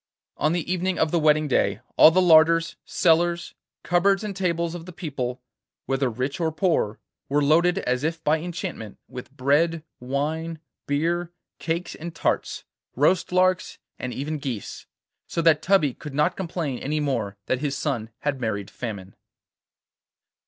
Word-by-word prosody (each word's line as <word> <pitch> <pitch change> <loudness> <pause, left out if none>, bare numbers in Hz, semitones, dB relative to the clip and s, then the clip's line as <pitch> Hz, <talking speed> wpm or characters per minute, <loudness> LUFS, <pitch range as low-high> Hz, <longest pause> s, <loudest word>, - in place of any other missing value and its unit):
On 155 - +2
the 175 0 -2
evening 185 0 -1
of 160 -1 +1
the 170 - +2
wedding 155 0 +3
day 100 -6 +1 0.2
all - - +9
the 185 +3 +3
larders, 165 0 +5
cellars, 170 0 +2 0.3
cupboards 195 +3 +2
and 205 -2 -4
tables 170 -3 -1
of 175 0 -8
the - - -7
people, 130 -7 -4 0.4
whether 135 0 0
rich 130 - -3
or 165 -2 0
poor, 155 - 0 0.3
were 145 +1 +2
loaded 170 +5 +4
as 125 -7 -1
if 160 0 -2
by 155 +2 +2
enchantment 175 - -6
with 125 -1 -9
bread, 150 +5 +2 0.2
wine, 155 +6 -2 0.3
beer, 170 +4 0 0.3
cakes 170 +2 -2
and 170 +1 -8
tarts, - - -1 0.3
roast 165 +8 +2
larks, 185 0 +2 0.2
and 125 - -4
even 150 +4 -3
geese, 130 -7 -6 0.4
so - - -3
that 160 -2 +4
Tubby 170 -8 +3
could 145 +1 -9
not 150 +5 +2
complain 165 -8 -3
any 150 +2 -2
more 115 -9 -2
that 130 - 0
his 140 -1 -2
son 120 -7 -2
had 140 -3 -2
married 105 -3 -3
Famine. 100 -5 -6
155 Hz, 155 wpm, -24 LUFS, 135-170 Hz, 0.4 s, all